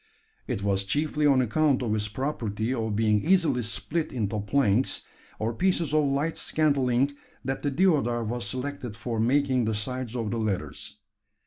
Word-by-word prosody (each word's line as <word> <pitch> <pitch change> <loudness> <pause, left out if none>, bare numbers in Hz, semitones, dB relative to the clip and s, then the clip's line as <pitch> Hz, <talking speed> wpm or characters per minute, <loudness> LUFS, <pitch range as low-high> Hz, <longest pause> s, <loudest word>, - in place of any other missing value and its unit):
It 100 - -2
was 100 -1 +1
chiefly 150 +7 +1
on 135 -3 +5
account 135 +2 +2
of 110 -3 0
its 105 -1 0
property 110 -1 -2
of 110 -4 -2
being 105 -1 +2
easily 170 -7 +3
split 150 +8 -2
into 110 -4 -2
planks, 115 +2 +1 0.3
or 110 +2 -1
pieces 170 +1 +1
of 155 -1 +4
light 140 +4 0
scantling, 140 -3 +2 0.3
that 135 0 -2
the 145 - 0
deodar 140 -7 +2
was 120 +2 -3
selected 130 -1 -4
for 115 -1 -3
making 130 +1 +2
the 110 0 0
sides 125 +2 -4
of 115 -4 -2
the 115 - -1
ladders. 105 -1 -3
125 Hz, 160 wpm, -27 LUFS, 110-145 Hz, 0.3 s, on